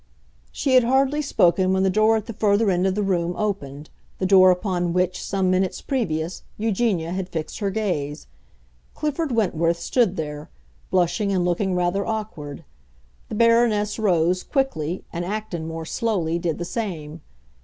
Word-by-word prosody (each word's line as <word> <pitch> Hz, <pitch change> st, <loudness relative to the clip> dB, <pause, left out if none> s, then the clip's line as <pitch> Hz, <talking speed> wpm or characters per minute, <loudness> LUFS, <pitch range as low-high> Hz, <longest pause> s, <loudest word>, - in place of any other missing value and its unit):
She 270 Hz, -, -1 dB
had 255 Hz, -1 st, +7 dB
hardly 270 Hz, +4 st, +2 dB
spoken 185 Hz, -, +2 dB
when 190 Hz, 0 st, +2 dB
the 190 Hz, -, +3 dB
door 215 Hz, +3 st, +4 dB
at 215 Hz, -, -5 dB
the 230 Hz, -, -6 dB
further 205 Hz, 0 st, +2 dB
end 180 Hz, +1 st, +1 dB
of 190 Hz, -, 0 dB
the 210 Hz, -, 0 dB
room 175 Hz, -3 st, 0 dB
opened—the 155 Hz, -4 st, -5 dB
door 185 Hz, -1 st, +7 dB
upon 180 Hz, -2 st, 0 dB
which, 180 Hz, 0 st, 0 dB
some 190 Hz, -2 st, 0 dB
minutes 185 Hz, 0 st, 0 dB
previous, 175 Hz, -, -2 dB, 0.2 s
Eugenia 205 Hz, -6 st, 0 dB
had 185 Hz, 0 st, -3 dB
fixed 160 Hz, -3 st, -5 dB
her 200 Hz, -2 st, 0 dB
gaze. 175 Hz, -9 st, -2 dB, 0.7 s
Clifford 305 Hz, 0 st, -2 dB
Wentworth 170 Hz, -7 st, +1 dB
stood 195 Hz, +2 st, +1 dB
there, 150 Hz, -3 st, -5 dB, 0.4 s
blushing 180 Hz, +3 st, +1 dB
and 185 Hz, -2 st, +1 dB
looking 180 Hz, +2 st, 0 dB
rather 180 Hz, +2 st, 0 dB
awkward. 210 Hz, -11 st, -5 dB, 0.7 s
The -, -, -4 dB
Baroness 230 Hz, -2 st, +3 dB
rose, 180 Hz, -3 st, +2 dB
quickly, 180 Hz, -, -2 dB
and 170 Hz, 0 st, -3 dB
Acton, 190 Hz, -4 st, -4 dB
more 165 Hz, 0 st, -5 dB
slowly, 170 Hz, -3 st, -1 dB
did 165 Hz, -2 st, -2 dB
the 175 Hz, -, -4 dB
same. 170 Hz, -7 st, -5 dB
185 Hz, 155 wpm, -23 LUFS, 170-215 Hz, 0.7 s, had